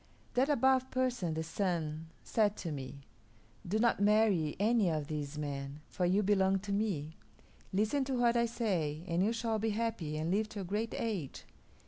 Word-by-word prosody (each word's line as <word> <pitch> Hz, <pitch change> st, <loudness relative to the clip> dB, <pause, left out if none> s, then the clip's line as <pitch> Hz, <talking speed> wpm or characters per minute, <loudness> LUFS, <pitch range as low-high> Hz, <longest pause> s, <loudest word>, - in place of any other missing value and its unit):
That 260 Hz, +3 st, +2 dB
Above 260 Hz, -1 st, +3 dB
Person, 245 Hz, -10 st, 0 dB
the 160 Hz, -, -1 dB
Sun, 165 Hz, -3 st, -2 dB, 0.2 s
said 210 Hz, -2 st, +1 dB
to 165 Hz, -, -4 dB
me, 140 Hz, 0 st, -6 dB, 0.7 s
'Do 200 Hz, +5 st, +1 dB
not 230 Hz, -1 st, +3 dB
marry 205 Hz, -7 st, +3 dB
any 215 Hz, -2 st, +3 dB
of 155 Hz, -2 st, -1 dB
these 150 Hz, -1 st, -4 dB
men, 140 Hz, 0 st, -4 dB
for 180 Hz, -, 0 dB
you 195 Hz, +4 st, +3 dB
belong 195 Hz, -1 st, +3 dB
to 200 Hz, 0 st, -5 dB
me. 185 Hz, -7 st, -1 dB, 0.5 s
Listen 215 Hz, +8 st, +1 dB
to 265 Hz, 0 st, -1 dB
what 240 Hz, -1 st, +3 dB
I 235 Hz, 0 st, +3 dB
say, 175 Hz, -10 st, -1 dB
and 170 Hz, +1 st, +1 dB
you 215 Hz, -, +2 dB
shall 225 Hz, -1 st, -1 dB
be 220 Hz, +1 st, 0 dB
happy 210 Hz, -9 st, -2 dB
and 160 Hz, +2 st, -1 dB
live 210 Hz, +3 st, +1 dB
to 215 Hz, -2 st, -5 dB
a -, -, -5 dB
great 210 Hz, +5 st, -2 dB
age.' 200 Hz, -, -3 dB
200 Hz, 180 wpm, -33 LUFS, 160-225 Hz, 0.7 s, Above